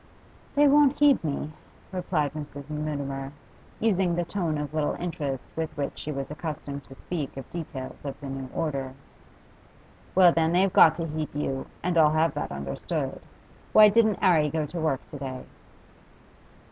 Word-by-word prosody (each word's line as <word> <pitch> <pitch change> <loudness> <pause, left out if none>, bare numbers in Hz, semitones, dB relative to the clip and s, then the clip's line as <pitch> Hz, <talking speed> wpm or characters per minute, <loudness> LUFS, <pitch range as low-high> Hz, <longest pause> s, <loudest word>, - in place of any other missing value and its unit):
'They 290 0 +6
won't 285 -1 +5
heed 290 -7 +5
me,' 150 0 -3 0.4
replied 175 -6 -1
Mrs. 145 -1 -8
Mutimer, 140 -3 -3 0.5
using 190 -5 +2
the 175 0 0
tone 170 -4 -1
of 150 0 -4
little 155 -1 0
interest 145 -6 -4
with 160 -1 -2
which 140 -1 -3
she 150 - -4
was 135 0 -4
accustomed 145 -2 -5
to 135 - -13
speak 150 -3 -5
of 135 - -7
details 145 -6 -6
of 140 -2 -6
the 145 - -9
new 135 -1 -5
order. 135 -5 -3 1.2
'Well, 180 -2 +8
then, 165 0 +2
they've 185 +1 +3
got 160 - +7
to 165 - -3
heed 155 -1 -3
you, 135 -2 -2 0.2
and 175 -1 +2
I'll 155 -1 +6
have 160 +1 +2
that - - -4
understood. 70 -1 -4 0.5
Why 215 -1 +9
didn't 220 0 +3
'Arry 160 -6 +4
go 155 0 -1
to 160 +4 -6
work 155 -5 -1
to 145 - -7
day? 130 -2 -5
155 Hz, 165 wpm, -27 LUFS, 140-175 Hz, 1.2 s, Why